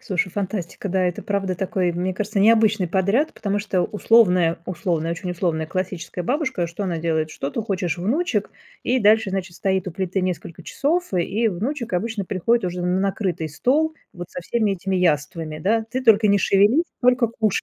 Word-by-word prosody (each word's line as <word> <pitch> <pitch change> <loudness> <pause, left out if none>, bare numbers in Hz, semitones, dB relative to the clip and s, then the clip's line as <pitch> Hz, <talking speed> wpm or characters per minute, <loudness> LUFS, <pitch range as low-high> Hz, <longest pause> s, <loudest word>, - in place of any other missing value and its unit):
Слушай, 185 0 -1
фантастика, 195 0 -4
да, 190 0 +1
это, 180 -1 -2
правда, 195 -2 -1
такой, 185 -1 -1
мне 180 +2 -2
кажется, 210 +2 -2
необычный 220 -2 +4
подряд, 200 - +1
потому 200 -1 -2
что 200 -3 0
условная 185 -5 +3
условная, 170 -2 -1
очень 180 +2 -5
условная 165 -3 -1
классическая 180 0 -4
бабушка, 260 - -1
что 170 +4 -6
она 175 -3 -2
делает: 160 -1 -1
что 140 -2 -4
ты - - -3
хочешь, 185 -5 -2
внучек, 265 - 0 0.3
и 255 - +1
дальше, 215 -2 +4
значит, 190 -2 -4
стоит 190 -1 0
у - - -5
плиты 190 +2 -2
несколько 175 -2 -4
часов, 335 - -1
и 200 +6 +1
внучек 235 +6 -3
обычно 205 +3 -1
приходит 210 +5 +1
уже 180 0 -4
на 180 +1 +1
накрытый 190 -4 -1
стол, 295 - +1 0.2
вот 175 0 -8
со - - -6
всеми 215 +3 0
этими 190 0 -2
яствами, 155 -2 0
да. 220 +7 +1
Ты 260 +1 -2
только 220 -3 +5
не 200 0 +4
шевелись, 205 - +4 0.2
только 250 -1 +3
кушай. 220 -3 0
190 Hz, 180 wpm, -22 LUFS, 175-220 Hz, 0.3 s, только